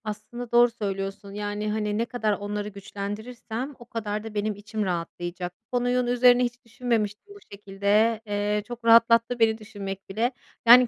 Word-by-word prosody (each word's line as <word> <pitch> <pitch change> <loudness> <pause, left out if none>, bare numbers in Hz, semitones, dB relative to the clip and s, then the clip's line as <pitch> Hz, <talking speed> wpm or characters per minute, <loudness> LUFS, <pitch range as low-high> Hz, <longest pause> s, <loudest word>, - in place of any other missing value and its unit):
Aslında 230 +3 -6
doğru 240 0 +6
söylüyorsun, 195 -2 -4
yani, 205 +1 -2
hani, 210 -1 -1
ne 230 - +1
kadar 225 -3 0
onları 205 0 -3
güçlendirirsem 220 +6 -6
o 240 - -12
kadar 215 -2 -3
da 225 -1 -7
benim 210 0 -1
içim 210 +1 -4
rahatlayacak. 175 0 -3
Bu 225 +3 -4
konunun 245 0 +1
üzerine 245 0 +5
hiç 240 0 -3
düşünmemiştim 230 - -2
bu - - -12
şekilde. 205 +3 +1
Eee, 205 0 0
çok 240 -1 -8
rahatlattı 230 +1 +6
beni 220 -1 +4
düşünmek 200 -3 -7
bile. 225 +6 +1 0.4
Yani, 245 +1 +10
215 Hz, 160 wpm, -26 LUFS, 205-240 Hz, 0.4 s, Yani